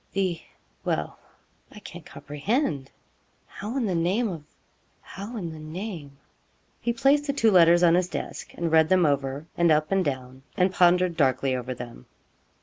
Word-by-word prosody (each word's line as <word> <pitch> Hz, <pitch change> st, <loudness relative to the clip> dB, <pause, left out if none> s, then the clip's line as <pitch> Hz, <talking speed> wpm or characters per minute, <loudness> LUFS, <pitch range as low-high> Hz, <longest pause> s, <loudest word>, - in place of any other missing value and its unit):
the 185 Hz, -4 st, -1 dB, 0.4 s
Well -, -, -2 dB, 0.5 s
I -, -, -14 dB
can't 175 Hz, -5 st, -10 dB
comprehend 150 Hz, -, -2 dB, 0.6 s
how 220 Hz, +7 st, -6 dB
in 255 Hz, -, 0 dB
the 190 Hz, -, -1 dB
name 185 Hz, +8 st, +1 dB
of 165 Hz, -5 st, -6 dB, 0.6 s
how 205 Hz, +5 st, -8 dB
in 170 Hz, -6 st, -4 dB
the 160 Hz, -, -9 dB
name 155 Hz, -3 st, -7 dB, 0.3 s
' -, -, -41 dB
He 240 Hz, -, 0 dB
placed 275 Hz, +5 st, +2 dB
the 280 Hz, -, 0 dB
two 225 Hz, -5 st, +3 dB
letters 175 Hz, -1 st, +6 dB
on 170 Hz, -1 st, +6 dB
his 180 Hz, 0 st, +2 dB
desk, -, -, -6 dB
and 170 Hz, -1 st, -2 dB
read 160 Hz, -1 st, +5 dB
them 185 Hz, -2 st, +4 dB
over, 140 Hz, 0 st, -1 dB
and 170 Hz, -1 st, +3 dB
up 155 Hz, +2 st, +2 dB
and 195 Hz, -1 st, +2 dB
down, 130 Hz, -3 st, -4 dB, 0.2 s
and 185 Hz, 0 st, +2 dB
pondered 180 Hz, -1 st, +3 dB
darkly 130 Hz, -2 st, +1 dB
over 125 Hz, 0 st, -4 dB
them. 120 Hz, -, -10 dB
170 Hz, 170 wpm, -26 LUFS, 145-195 Hz, 0.6 s, letters